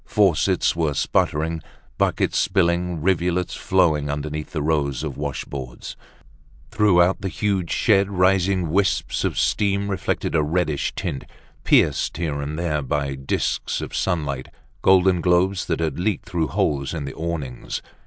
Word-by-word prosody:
Faucets 95 Hz, -8 st, +2 dB
were 80 Hz, -4 st, 0 dB
sputtering, 80 Hz, +3 st, 0 dB, 0.4 s
buckets -, -, +1 dB
spilling, 90 Hz, -3 st, +1 dB
rivulets 90 Hz, 0 st, +1 dB
flowing 80 Hz, -8 st, +1 dB
underneath 75 Hz, +1 st, -4 dB
the 75 Hz, -3 st, -3 dB
rows 70 Hz, -4 st, 0 dB
of -, -, -4 dB
washboards. 70 Hz, -2 st, -6 dB, 0.8 s
Throughout 95 Hz, -4 st, +3 dB
the 95 Hz, -, -2 dB
huge 95 Hz, -2 st, -1 dB
shed 100 Hz, -3 st, +3 dB
rising 95 Hz, -2 st, +2 dB
wisps 95 Hz, +1 st, +1 dB
of -, -, -1 dB
steam 100 Hz, 0 st, +1 dB
reflected 95 Hz, -, -2 dB
a 80 Hz, -, +3 dB
reddish 75 Hz, -1 st, 0 dB
tint, 70 Hz, -, -4 dB, 0.4 s
pierced -, -, +2 dB
here 75 Hz, -4 st, -2 dB
and 75 Hz, +2 st, -4 dB
there 80 Hz, -3 st, -1 dB
by 70 Hz, +1 st, -2 dB
disks 65 Hz, 0 st, -2 dB
of -, -, -6 dB
sunlight, 70 Hz, -6 st, -1 dB, 0.3 s
golden 95 Hz, -2 st, +4 dB
globes 90 Hz, +2 st, +2 dB
that 85 Hz, -, -1 dB
had 80 Hz, 0 st, -2 dB
leaked 100 Hz, +2 st, -1 dB
through 80 Hz, -3 st, -1 dB
holes 70 Hz, +2 st, -1 dB
in 75 Hz, -4 st, -4 dB
the 70 Hz, -, -6 dB
awnings. 80 Hz, -7 st, -4 dB
85 Hz, 140 wpm, -22 LUFS, 75-95 Hz, 0.8 s, golden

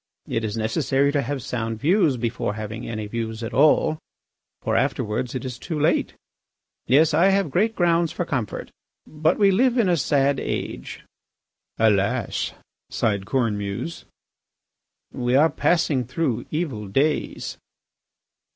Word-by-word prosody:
It 115 Hz, -, -2 dB
is 110 Hz, 0 st, -3 dB
necessary 135 Hz, +5 st, +1 dB
to 145 Hz, -1 st, +1 dB
have 135 Hz, 0 st, -4 dB
sound 115 Hz, -2 st, -3 dB
views 160 Hz, -, +3 dB
before 115 Hz, -3 st, -2 dB
having 110 Hz, +1 st, -6 dB
any 110 Hz, -2 st, -4 dB
views 110 Hz, +1 st, -4 dB
at 115 Hz, -, -5 dB
all, 155 Hz, +2 st, +4 dB, 0.6 s
for -, -, 0 dB
afterwards 110 Hz, +4 st, -1 dB
it 130 Hz, -, -4 dB
is 125 Hz, -2 st, -6 dB
too 160 Hz, -3 st, -4 dB
late.... 155 Hz, +4 st, +1 dB, 0.7 s
Yes, 150 Hz, +5 st, +4 dB
I 170 Hz, +5 st, +5 dB
have 195 Hz, -5 st, +2 dB
great 220 Hz, +8 st, +1 dB
grounds 170 Hz, -2 st, +2 dB
for 175 Hz, -, -3 dB
comfort. 125 Hz, -, -3 dB, 0.3 s
But 155 Hz, +2 st, 0 dB
we 200 Hz, -2 st, +5 dB
live 250 Hz, +5 st, +3 dB
in 225 Hz, -5 st, +3 dB
a 175 Hz, -, +3 dB
sad 140 Hz, -1 st, +2 dB
age." -, -, -5 dB, 0.7 s
"Alas!" 105 Hz, -3 st, +1 dB, 0.4 s
sighed 100 Hz, -3 st, -1 dB
Cornemuse. 105 Hz, +3 st, -2 dB, 1.1 s
"We 125 Hz, +1 st, 0 dB
are 155 Hz, +4 st, +5 dB
passing 155 Hz, -6 st, +1 dB
through 130 Hz, -2 st, -2 dB
evil 140 Hz, -, -3 dB
days. 140 Hz, +10 st, -1 dB
135 Hz, 135 wpm, -23 LUFS, 115-160 Hz, 1.1 s, I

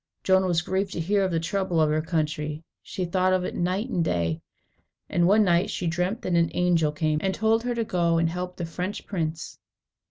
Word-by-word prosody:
Joan 190 Hz, 0 st, +3 dB
was 170 Hz, -2 st, +1 dB
grieved 190 Hz, +2 st, -1 dB
to -, -, -4 dB
hear 195 Hz, +4 st, +1 dB
of 190 Hz, -, +1 dB
the 165 Hz, -2 st, 0 dB
trouble 190 Hz, 0 st, -1 dB
of 155 Hz, -1 st, +3 dB
her 155 Hz, +1 st, +1 dB
country. 155 Hz, -1 st, -2 dB, 0.2 s
She 185 Hz, -, -4 dB
thought 185 Hz, +1 st, +1 dB
of 185 Hz, -1 st, +1 dB
it -, -, -4 dB
night 185 Hz, +6 st, -1 dB
and 180 Hz, -9 st, 0 dB
day, 85 Hz, -, -1 dB, 0.7 s
and 175 Hz, 0 st, +2 dB
one 210 Hz, +3 st, +5 dB
night 175 Hz, 0 st, +2 dB
she 180 Hz, -, -3 dB
dreamt 180 Hz, +6 st, -1 dB
that 180 Hz, -, -1 dB
an 170 Hz, -1 st, +3 dB
angel 170 Hz, -4 st, +2 dB
came, 155 Hz, 0 st, 0 dB
and 190 Hz, -1 st, 0 dB
told 220 Hz, +1 st, +2 dB
her 245 Hz, 0 st, -2 dB
to 230 Hz, -, 0 dB
go 170 Hz, -5 st, +1 dB
and 165 Hz, 0 st, +2 dB
help 180 Hz, +2 st, -4 dB
the 170 Hz, -, -3 dB
French 180 Hz, +4 st, -5 dB
prince. 160 Hz, -4 st, -4 dB
175 Hz, 220 wpm, -25 LUFS, 165-190 Hz, 0.7 s, one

